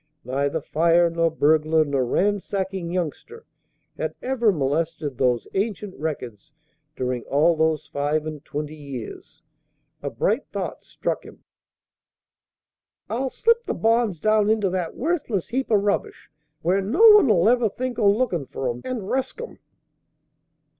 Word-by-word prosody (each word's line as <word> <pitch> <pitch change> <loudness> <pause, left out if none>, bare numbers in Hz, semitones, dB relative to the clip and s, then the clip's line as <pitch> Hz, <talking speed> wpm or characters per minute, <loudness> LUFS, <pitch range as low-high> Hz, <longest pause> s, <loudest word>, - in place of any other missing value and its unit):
Neither 140 +4 -1
fire 170 +3 +3
nor 165 0 +2
burglar 155 0 +3
nor 140 -3 0
ransacking 190 +3 -1
youngster 185 - -4 0.5
had - - -2
ever 245 -4 +1
molested 150 -1 -1
those 125 -3 +1
ancient 200 -1 -2
records 150 -3 -5 0.4
during 125 -1 -2
all 160 +4 +3
those 160 -1 +1
five 150 +2 -1
and 155 -2 -6
twenty 150 0 -5
years. 140 -6 -9 0.6
A - - -3
bright - - -1
thought - - -5
struck - - -3
him. - - -15 1.7
"I'll 260 +4 -1
slip 465 - +2
the - - -2
bonds 225 -5 +1
down 215 +1 +3
into 210 -4 +2
that 180 -3 -3
worthless 280 - -1
heap 260 +2 -2
o' - - +6
rubbish, 200 0 -1 0.3
where 185 +4 +2
no 275 - +5
one 420 - +6
'ull 185 -2 +4
ever 240 -1 +3
think 250 +3 -4
o' 205 -3 +5
lookin' 200 - 0
for 130 -2 -3
'em, 120 +1 -8
and 255 -3 -3
resk 265 - -2
'em." 480 - -8
175 Hz, 140 wpm, -23 LUFS, 150-220 Hz, 1.7 s, o